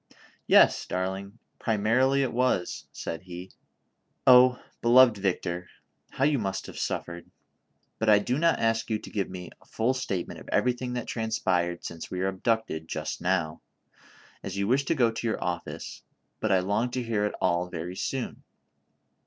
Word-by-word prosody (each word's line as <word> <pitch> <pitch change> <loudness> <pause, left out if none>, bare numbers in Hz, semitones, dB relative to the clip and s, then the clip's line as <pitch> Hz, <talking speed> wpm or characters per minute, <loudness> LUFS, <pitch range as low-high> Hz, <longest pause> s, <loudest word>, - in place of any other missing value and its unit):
"Yes, - - +6
darling, 95 +3 -3 0.2
primarily 120 +6 +2
it 130 - -2
was," 120 -7 0
said 80 - -5
he. 90 0 -9 0.4
" - - -48
Oh! 125 0 +7 0.2
beloved 120 0 +7
Victor, 90 -3 -2 0.4
how 135 - -2
you 145 -1 +3
must 95 -3 -3
have - - -8
suffered; 85 0 -4 0.7
but 110 - +1
I 105 - +8
do 125 +7 0
not 170 0 +3
ask 115 0 0
you 110 - +1
to - - -11
give 100 -3 -2
me 90 -1 -8
a - - -22
full 115 +4 0
statement 100 -9 -3
of - - -12
everything 125 0 0
that 125 - -3
transpired 90 -6 -1
since 85 -1 -7
we 90 - -5
were 95 +1 +1
abducted, 95 -4 -1
just 75 -1 -4
now, 90 -3 0 0.8
as 95 0 -6
you 100 - 0
■wish 130 +6 +1
to 165 - +2
go 120 -5 +3
to 115 +1 -3
your 110 - -1
office, 90 -1 -5 0.4
but 110 - 0
I 95 -1 +4
long 105 +6 0
to 125 - -1
hear 110 -3 0
it - - -6
all 85 +1 +1
very 90 +1 -5
soon. 130 +6 -3
105 Hz, 170 wpm, -27 LUFS, 90-125 Hz, 0.8 s, I